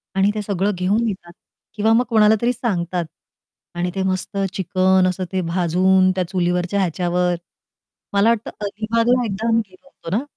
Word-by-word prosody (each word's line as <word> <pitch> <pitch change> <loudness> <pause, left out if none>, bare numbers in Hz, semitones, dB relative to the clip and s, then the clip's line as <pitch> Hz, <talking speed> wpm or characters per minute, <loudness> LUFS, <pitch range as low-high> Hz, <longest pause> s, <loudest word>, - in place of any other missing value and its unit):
आणि 195 +1 +3
ते 210 - -2
सगळं 200 0 -1
घेऊन 200 +6 +1
येतात. 185 -4 -5 0.4
किंवा 220 +1 +2
मग 240 +2 +4
कोणाला 220 -2 +5
तरी 240 +1 +2
सांगतात 180 -7 -2 0.7
आणि 175 +1 -2
ते 190 - -1
मस्त 185 +2 -3 0.2
चिकन 185 0 +2
असं 185 +1 -3
ते 190 -1 0
भाजून, 185 +2 +3
त्या 185 - +1
चुलीवरच्या 180 +1 0
ह्याच्यावर 180 0 0 0.8
मला 200 +3 +4
वाटतं 230 -1 0 0.2
अलिबागला 230 +4 +1
एकदा 215 +2 -3
आम्ही 230 0 +3
गेलो 185 +9 -21
होतो 180 -8 -6
ना, 245 - -2
190 Hz, 160 wpm, -20 LUFS, 180-220 Hz, 0.8 s, कोणाला